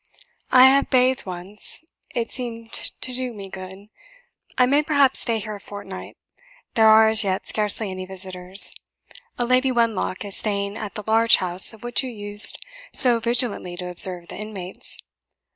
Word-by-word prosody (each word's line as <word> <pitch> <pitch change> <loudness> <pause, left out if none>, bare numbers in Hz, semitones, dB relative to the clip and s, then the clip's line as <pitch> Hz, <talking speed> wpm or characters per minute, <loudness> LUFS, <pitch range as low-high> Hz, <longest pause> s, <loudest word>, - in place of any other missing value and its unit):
I 255 - +7
have 275 +1 +4
bathed 255 -3 +2
once; 185 - -6 0.3
it 230 -1 -2
seemed 230 -3 -6
to 255 - -4
do 250 -1 -4
me 200 -2 -9
good. 190 +2 -10 0.7
I 250 - +5
may, 280 +4 +3
perhaps, 285 -4 +3
stay 230 -2 +1
here 215 0 -5
a 205 - -8
fortnight. 205 0 -10 0.6
There 220 -1 +4
are 220 0 +7
as 220 0 +3
yet 190 -1 -2
scarcely 210 -1 -2
any 185 0 -7
visitors. 185 0 +2 0.6
A 245 - -1
Lady 255 +2 +2
Wenlock 230 -5 -1
is 200 - -5
staying 200 -1 -1
at 215 -2 -7
the 210 - -6
large 225 +1 +5
house 180 0 +3
of 220 -1 -15
which 240 0 0
you 260 - -5
used 205 -2 +1 0.3
so 245 -3 +4
vigilantly 230 -6 0
to 180 0 -5
observe 180 -1 +1
the - - -8
inmates. 200 -4 -6
215 Hz, 165 wpm, -22 LUFS, 190-240 Hz, 0.7 s, I